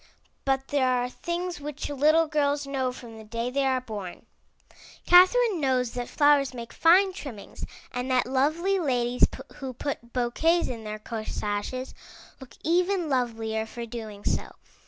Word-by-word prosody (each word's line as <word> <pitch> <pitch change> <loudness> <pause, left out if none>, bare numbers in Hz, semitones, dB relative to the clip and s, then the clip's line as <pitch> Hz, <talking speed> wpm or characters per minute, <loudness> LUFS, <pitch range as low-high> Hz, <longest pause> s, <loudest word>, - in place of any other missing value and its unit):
But 270 0 0
there 275 -3 +2
are 250 -1 +1
things 345 +1 -4
which 295 0 -5
little 305 +3 +3
girls 290 -2 0
know 265 -2 -1
from 235 -3 -11
the - - -10
day 230 +3 -3
they 275 +1 +1
are 260 -1 +2
born. 210 -7 -7 0.8
Catherine 370 +2 +6
knows 255 -3 +1
that 245 -1 -5
flowers 290 -3 +3
make 235 -1 -8
fine 370 +4 +5
trimmings, 255 - -9 0.3
and 250 +1 -3
that 255 -1 +3
lovely 310 +9 +1
ladies 250 -5 +2 0.3
who 265 -2 -5
put 235 -3 -5
bouquets 285 +8 +1
in 230 -3 -6
their 215 0 -4
corsages 215 +3 -4 0.5
look 255 -4 -13
even 355 +1 +1
lovelier 225 -4 -1
for 235 +1 -6
doing 220 -3 -8
so. - - -1
260 Hz, 150 wpm, -27 LUFS, 235-300 Hz, 0.8 s, Catherine